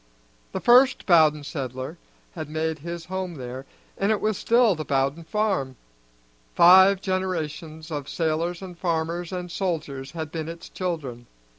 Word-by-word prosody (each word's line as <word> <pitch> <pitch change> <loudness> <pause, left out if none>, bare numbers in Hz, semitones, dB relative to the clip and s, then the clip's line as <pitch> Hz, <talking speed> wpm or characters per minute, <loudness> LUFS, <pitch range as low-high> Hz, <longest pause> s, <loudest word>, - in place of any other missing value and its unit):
The - - -3
first 255 +2 +5
Bowden 155 -4 +5
settler 130 -3 -5 0.3
had 155 - -6
made 160 0 -2
his 170 +2 -6
home 185 -1 -4
there, 130 0 -7 0.3
and 200 +2 +2
it 215 - +1
was 215 -1 0
still 235 +1 +3
the 155 -2 -4
Bowden 140 +3 0
farm; 175 -8 -1 0.8
five 190 +3 +7
generations 165 -4 -3
of 145 -2 -4
sailors 165 +2 -1
and 180 -2 -8
farmers 170 0 -2
and 180 -1 -5
soldiers 150 -8 -3
had 160 -2 -5
been 160 -1 -4
its 170 0 -9
children. 140 -10 -4
165 Hz, 145 wpm, -25 LUFS, 150-185 Hz, 0.8 s, five